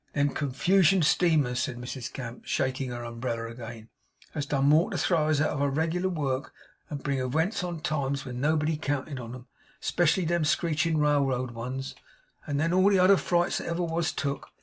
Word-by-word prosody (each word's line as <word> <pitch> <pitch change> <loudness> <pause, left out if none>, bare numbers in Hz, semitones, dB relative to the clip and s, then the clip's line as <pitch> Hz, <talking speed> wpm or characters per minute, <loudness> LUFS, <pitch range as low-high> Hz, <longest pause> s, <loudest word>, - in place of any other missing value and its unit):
Them 145 0 +2
Confugion 175 +6 +3
steamers,' 150 -6 +3
said 125 - -2
Mrs 125 0 -6
Gamp, 125 -2 -7
shaking 130 0 -1
her 120 -1 -5
umbrella 115 -1 -4
again, 115 -2 -9 0.5
'has 145 -2 -3
done 135 -1 +1
more 155 +4 +5
to - - -3
throw 160 -4 +2
us 155 -2 +2
out 155 - +2
of 145 - -2
our 140 - +2
reg'lar 165 +6 0
work 140 -6 -2 0.3
and 145 -3 -6
bring 140 -2 0
ewents 160 - 0
on 175 -1 -3
at 155 - -13
times 140 -4 -1
when 125 -1 -5
nobody 155 +1 +1
counted 145 -2 -3
on 120 0 -7
'em 125 -1 -11 0.3
(especially 175 +1 +2
them 170 0 +1
screeching 160 +1 +1
railroad 140 -4 +1
ones), 130 +4 -5 0.5
than 155 +3 0
all 185 +2 +5
the 200 - +4
other 185 +2 +6
frights 175 -2 +1
that - - -6
ever 170 +1 -1
was 165 0 0
took. 140 -3 -3
145 Hz, 190 wpm, -28 LUFS, 130-165 Hz, 0.5 s, other